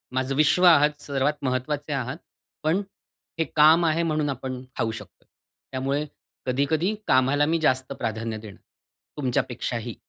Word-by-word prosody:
माझं 130 Hz, +1 st, 0 dB
विश्व 155 Hz, +4 st, +3 dB
आहात 150 Hz, -3 st, +5 dB
सर्वात 140 Hz, +1 st, 0 dB
महत्वाचे 145 Hz, +3 st, -2 dB
आहात, 130 Hz, +2 st, -3 dB, 0.5 s
पण 165 Hz, +6 st, +2 dB, 0.6 s
हे 165 Hz, -, +2 dB
काम 160 Hz, +3 st, +6 dB
आहे 165 Hz, +1 st, +2 dB
म्हणून 155 Hz, -3 st, 0 dB
आपण 130 Hz, -1 st, -4 dB, 0.2 s
खाऊ 115 Hz, -1 st, 0 dB
शकतोय. 110 Hz, -, -11 dB, 0.4 s
त्यामुळे 135 Hz, +3 st, -1 dB, 0.4 s
कधी-कधी 145 Hz, +9 st, +1 dB
कामाला 135 Hz, +3 st, +3 dB
मी 165 Hz, +2 st, +1 dB
जास्त 130 Hz, -2 st, +1 dB
प्राधान्य 110 Hz, -2 st, -3 dB
देणं, 105 Hz, -3 st, -11 dB, 0.6 s
तुमच्यापेक्षाही. 120 Hz, -3 st, -2 dB
140 Hz, 130 wpm, -25 LUFS, 130-155 Hz, 0.6 s, काम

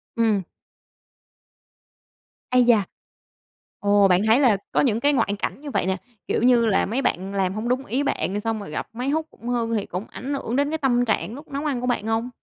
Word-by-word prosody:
Ừm. 220 Hz, -4 st, +2 dB, 2.1 s
Ây 250 Hz, 0 st, +5 dB
da! 235 Hz, -4 st, +4 dB, 1.0 s
Ồ! 205 Hz, -1 st, +4 dB
Bạn 180 Hz, 0 st, +3 dB
thấy 225 Hz, +4 st, +5 dB
là 245 Hz, -8 st, +4 dB
có -, -, +3 dB
những 230 Hz, -5 st, +2 dB
cái 290 Hz, +3 st, +3 dB
ngoại 205 Hz, -7 st, +1 dB
cảnh 275 Hz, -, -3 dB
như 290 Hz, -2 st, -6 dB
vậy -, -, 0 dB
nè. 190 Hz, 0 st, 0 dB, 0.3 s
Kiểu -, -, 0 dB
như 240 Hz, -2 st, +5 dB
là 210 Hz, -3 st, +2 dB
mấy 240 Hz, +6 st, -1 dB
bạn 195 Hz, -5 st, -1 dB
làm 190 Hz, -1 st, 0 dB
hông 215 Hz, +3 st, -3 dB
đúng 260 Hz, +2 st, 0 dB
ý 265 Hz, +5 st, -1 dB
bạn, 205 Hz, -7 st, -1 dB
xong 225 Hz, 0 st, -2 dB
rồi 200 Hz, -, -8 dB
gặp -, -, -4 dB
máy 250 Hz, +4 st, -3 dB
hút 315 Hz, +1 st, 0 dB
cũng 235 Hz, -, -12 dB
hư 230 Hz, -2 st, 0 dB
thì 205 Hz, -, -1 dB
cũng 180 Hz, +4 st, -5 dB
ảnh 275 Hz, +4 st, -5 dB
hưởng 250 Hz, -3 st, -3 dB
đến 285 Hz, +1 st, +2 dB
cái 320 Hz, -, 0 dB
tâm 245 Hz, -5 st, +2 dB
trạng 220 Hz, 0 st, -1 dB
lúc 290 Hz, +4 st, -10 dB
nấu 280 Hz, +2 st, -4 dB
ăn 270 Hz, -5 st, -1 dB
của 250 Hz, -, -2 dB
bạn 240 Hz, -3 st, -1 dB
hông? 225 Hz, +2 st, 0 dB
235 Hz, 220 wpm, -23 LUFS, 205-265 Hz, 2.1 s, Ây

